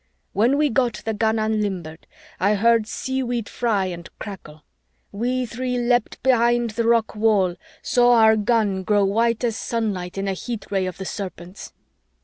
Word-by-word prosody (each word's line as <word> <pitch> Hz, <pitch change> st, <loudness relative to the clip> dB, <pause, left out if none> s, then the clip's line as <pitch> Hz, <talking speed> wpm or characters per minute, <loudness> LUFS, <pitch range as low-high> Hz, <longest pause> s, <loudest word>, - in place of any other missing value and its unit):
When 240 Hz, +7 st, +3 dB
we 300 Hz, 0 st, +2 dB
got 235 Hz, -4 st, 0 dB
the 220 Hz, -, -1 dB
gun 220 Hz, +1 st, +1 dB
unlimbered, 200 Hz, -7 st, -2 dB, 0.3 s
I 200 Hz, +3 st, +3 dB
heard 230 Hz, +1 st, +3 dB
seaweed 245 Hz, -3 st, -3 dB
fry 220 Hz, -5 st, 0 dB
and 175 Hz, -2 st, -6 dB
crackle. 155 Hz, -7 st, -9 dB, 0.5 s
We 250 Hz, +5 st, -1 dB
three 250 Hz, +2 st, -3 dB
leaped 240 Hz, -1 st, 0 dB
behind 240 Hz, -2 st, +3 dB
the 230 Hz, +1 st, -1 dB
rock 230 Hz, -2 st, +2 dB
wall, 210 Hz, -4 st, +2 dB, 0.3 s
saw 245 Hz, 0 st, +4 dB
our 220 Hz, -1 st, +6 dB
gun 210 Hz, -3 st, +1 dB
grow 205 Hz, +1 st, +2 dB
white 230 Hz, +4 st, +1 dB
as 230 Hz, -2 st, 0 dB
sunlight 200 Hz, -6 st, -3 dB
in 195 Hz, 0 st, -2 dB
a 195 Hz, -, 0 dB
heat 220 Hz, +2 st, -6 dB
ray 190 Hz, -2 st, 0 dB
of 185 Hz, -, -6 dB
the 190 Hz, -, -6 dB
Serpents! 185 Hz, -2 st, -7 dB
220 Hz, 160 wpm, -22 LUFS, 195-235 Hz, 0.5 s, our